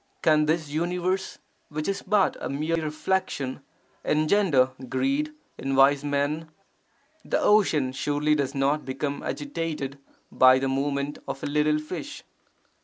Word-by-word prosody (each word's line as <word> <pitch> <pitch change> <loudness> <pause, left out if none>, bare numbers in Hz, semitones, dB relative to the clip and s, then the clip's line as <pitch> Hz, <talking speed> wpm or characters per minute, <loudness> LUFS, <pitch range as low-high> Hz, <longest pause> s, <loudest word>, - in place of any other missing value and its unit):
Can 155 -1 +4
this 160 -1 0
universe, 180 +4 -1 0.3
which 155 0 -4
is 195 0 -1
but 200 -1 +2
a - - -4
mere 155 +4 -1
reflection, 150 -4 -2 0.4
engender 155 -4 +3 0.2
greed 275 - 0 0.3
in 135 0 -1
wise 135 +1 +5
men? 145 +3 -1 0.7
The - - 0
ocean 160 -11 +3
surely 145 +3 0
does 140 -1 -1
not 140 +2 +1
become 140 +2 -3
agitated 160 - -4 0.3
by 130 0 +6
the 135 +1 0
movement 140 +1 -1
of 135 - -5
a - - -1
little 150 +1 +2
fish. 185 - -6
150 Hz, 130 wpm, -26 LUFS, 140-170 Hz, 0.7 s, by